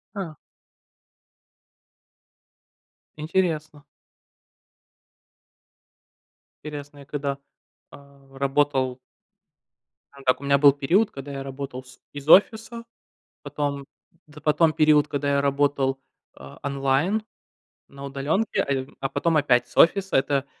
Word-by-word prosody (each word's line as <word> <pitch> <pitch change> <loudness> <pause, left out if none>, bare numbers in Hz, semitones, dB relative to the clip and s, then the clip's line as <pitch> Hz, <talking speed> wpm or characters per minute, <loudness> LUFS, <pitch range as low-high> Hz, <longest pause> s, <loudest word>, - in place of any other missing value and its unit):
А. 180 -6 -5 2.8
Интересно. 155 -2 -2 2.8
Интересно. 145 -1 -8
Я 140 - -13
когда, 140 -1 -3 0.5
а, 140 -1 -17
работал 135 -2 +1 1.3
Так 130 +1 +2
у - - -10
меня 140 0 +3
был 140 0 +6
период, 170 +10 +1
когда 140 +1 -8
я 135 0 -5
работал 135 -1 -7
с 125 0 -18
из 145 0 -9
офиса, 220 +5 +4 0.6
потом, 140 -1 -3 0.4
да, 150 0 -14
потом 155 +2 +3
период, 150 -1 +4
когда 145 -1 -2
я 140 - +2
работал, 140 -1 0 0.4
а, 70 0 -13
онлайн, 140 +9 0 0.6
на 140 0 -12
удаленке, 145 +10 -1
а, 140 - -4
я 130 -1 -1
а 135 - -2
потом 165 +3 +1
опять 125 -4 +2
с - - -19
офиса. 195 +3 +4
Это, 135 0 0
140 Hz, 110 wpm, -24 LUFS, 135-155 Hz, 2.8 s, был